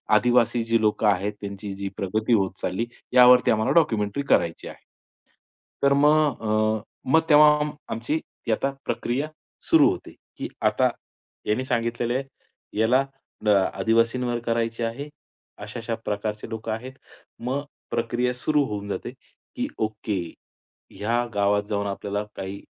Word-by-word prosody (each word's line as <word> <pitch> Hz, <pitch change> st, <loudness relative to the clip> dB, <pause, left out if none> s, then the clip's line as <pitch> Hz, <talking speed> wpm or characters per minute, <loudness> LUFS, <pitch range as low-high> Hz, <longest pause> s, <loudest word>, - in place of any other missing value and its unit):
आदिवासी 120 Hz, 0 st, +3 dB
जी 115 Hz, 0 st, +2 dB
लोकं 105 Hz, 0 st, +2 dB
आहेत, 100 Hz, +1 st, +1 dB
त्यांची 100 Hz, 0 st, -6 dB
जी 100 Hz, 0 st, -4 dB
प्रगती 110 Hz, +5 st, 0 dB
होत 95 Hz, -4 st, +2 dB
चालली, 95 Hz, +6 st, -1 dB, 0.3 s
यावरती 125 Hz, 0 st, +7 dB
आम्हाला 110 Hz, 0 st, +1 dB
डॉक्युमेंटरी 115 Hz, -6 st, +2 dB
करायची 85 Hz, -1 st, +2 dB
आहे. -, -, -12 dB, 1.0 s
तर 140 Hz, 0 st, +5 dB
मग 150 Hz, -1 st, +3 dB
अ, 110 Hz, 0 st, +1 dB, 0.3 s
मग 160 Hz, -, +6 dB
तेव्हा 150 Hz, 0 st, +7 dB, 0.4 s
आमची 120 Hz, +8 st, -1 dB, 0.3 s
यथा 115 Hz, +5 st, +1 dB
प्रक्रिया 130 Hz, +5 st, -1 dB, 0.4 s
सुरू -, -, +6 dB
होते, -, -, -7 dB, 0.3 s
की -, -, -4 dB, 0.2 s
आता -, -, +3 dB, 0.6 s
याने 110 Hz, +5 st, 0 dB
सांगितलेलं 120 Hz, -1 st, -1 dB
आहे. 135 Hz, -, 0 dB, 0.6 s
याला 125 Hz, +4 st, +4 dB, 0.4 s
द -, -, +3 dB
आदिवासींवर 115 Hz, +5 st, +2 dB
करायचे 115 Hz, 0 st, -1 dB
आहे, 115 Hz, +6 st, -3 dB, 0.5 s
अशा-अशा 115 Hz, +2 st, -5 dB
प्रकारचे 105 Hz, +1 st, -3 dB
लोकं 110 Hz, 0 st, -4 dB
आहेत. 125 Hz, +4 st, -5 dB, 0.5 s
मग 130 Hz, +4 st, -2 dB, 0.3 s
प्रक्रिया 120 Hz, +2 st, 0 dB
सुरू 145 Hz, +4 st, +1 dB
होऊन 100 Hz, -2 st, -5 dB
जाते, -, -, -4 dB, 0.4 s
की -, -, -1 dB
ओके, 110 Hz, -2 st, -2 dB, 0.8 s
या 120 Hz, +3 st, +1 dB
गावात 100 Hz, 0 st, +2 dB
जाऊन 100 Hz, -1 st, -1 dB
आपल्याला 100 Hz, +1 st, -3 dB
काही 95 Hz, +1 st, -6 dB
115 Hz, 130 wpm, -25 LUFS, 105-125 Hz, 1.0 s, यावरती